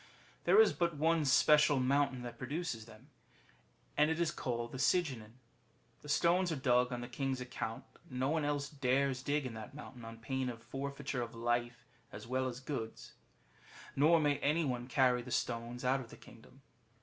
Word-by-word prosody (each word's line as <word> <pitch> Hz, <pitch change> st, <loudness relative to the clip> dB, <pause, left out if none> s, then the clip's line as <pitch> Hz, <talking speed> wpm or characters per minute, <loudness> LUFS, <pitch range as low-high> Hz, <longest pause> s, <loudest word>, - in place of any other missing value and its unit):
There -, -, +6 dB
is 445 Hz, -, +6 dB
but 170 Hz, -3 st, -1 dB
one 160 Hz, +1 st, +2 dB
special 150 Hz, +1 st, +5 dB
mountain 130 Hz, -1 st, +1 dB
that 120 Hz, -1 st, -8 dB
produces 145 Hz, -8 st, -4 dB
them, 115 Hz, +6 st, -16 dB, 0.8 s
and 150 Hz, +1 st, +4 dB
it 160 Hz, +1 st, -1 dB
is 170 Hz, -2 st, +1 dB
called 120 Hz, -6 st, -3 dB
Syghinan. 130 Hz, -5 st, 0 dB, 0.7 s
The 150 Hz, -, -11 dB
stones 175 Hz, +4 st, +3 dB
are -, -, 0 dB
dug 125 Hz, -2 st, +2 dB
on 120 Hz, -1 st, -3 dB
the 120 Hz, -, -5 dB
king's 135 Hz, +1 st, -2 dB
account, 115 Hz, -3 st, -5 dB, 0.3 s
and 125 Hz, -, -6 dB
no 130 Hz, +1 st, +1 dB
one 160 Hz, 0 st, +1 dB
else 145 Hz, -1 st, -1 dB
dares 135 Hz, -2 st, 0 dB
dig 145 Hz, 0 st, 0 dB
in 125 Hz, -, -4 dB
that 110 Hz, +4 st, -9 dB
mountain 130 Hz, -5 st, -10 dB
on 115 Hz, 0 st, -8 dB
pain 130 Hz, +3 st, -2 dB
of 115 Hz, -2 st, -8 dB
forfeiture 140 Hz, -1 st, -4 dB
of 115 Hz, -1 st, -6 dB
life 120 Hz, 0 st, -1 dB, 0.3 s
as 105 Hz, +1 st, -9 dB
well 130 Hz, +2 st, -1 dB
as 125 Hz, -1 st, -5 dB
goods; 130 Hz, -5 st, -6 dB, 0.8 s
nor 160 Hz, +4 st, +5 dB
may 145 Hz, -2 st, +1 dB
any 155 Hz, +3 st, +1 dB
one 125 Hz, -2 st, -2 dB
carry 125 Hz, -1 st, +3 dB
the 125 Hz, -, -10 dB
stones 120 Hz, +1 st, -2 dB
out 130 Hz, +2 st, +3 dB
of 120 Hz, -3 st, -9 dB
the -, -, -12 dB
kingdom. 135 Hz, +4 st, -17 dB
130 Hz, 185 wpm, -34 LUFS, 120-145 Hz, 0.8 s, There